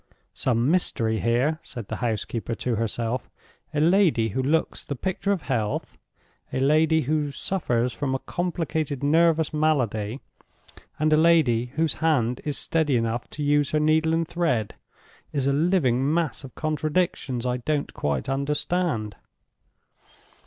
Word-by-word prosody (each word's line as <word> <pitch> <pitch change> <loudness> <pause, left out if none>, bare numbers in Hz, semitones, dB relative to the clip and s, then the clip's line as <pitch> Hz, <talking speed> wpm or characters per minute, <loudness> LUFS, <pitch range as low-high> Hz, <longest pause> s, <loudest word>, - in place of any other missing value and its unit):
"Some 125 +2 +1
mystery 115 -11 +1
here," 125 +7 +1
said 115 -5 -8
the - - -4
housekeeper 115 -1 -2
to 125 - -2
herself. 115 +2 -2 0.4
"A 150 - -1
lady 165 - +3
who 130 +6 -1
looks 155 +5 0
the 140 - -4
picture 190 +7 -2
of 190 -5 -1
health; 105 -3 -2 0.6
a - - -1
lady 155 +3 +3
who 150 +1 0
suffers 125 -8 -1
from 135 -2 -2
a - - -2
complicated 160 -5 -2
nervous 160 +1 +3
malady; 130 -7 0 0.8
and 155 0 +2
a - - +5
lady 155 -8 +4
whose 160 -1 +1
hand 125 -7 +1
is 145 -2 -2
steady 155 -5 +1
enough 115 +1 -2
to 150 - -5
use 145 -1 +2
her 155 - +1
needle 160 +1 +3
and 165 0 0
thread—is 140 -2 -3
a 140 - +2
living 145 -5 +2
mass 160 -5 -1
of 135 - -11
contradictions 155 -5 -1
I 125 0 0
don't 145 +4 -2
quite 70 -3 -2
understand. 140 - -1
145 Hz, 140 wpm, -25 LUFS, 120-160 Hz, 0.8 s, a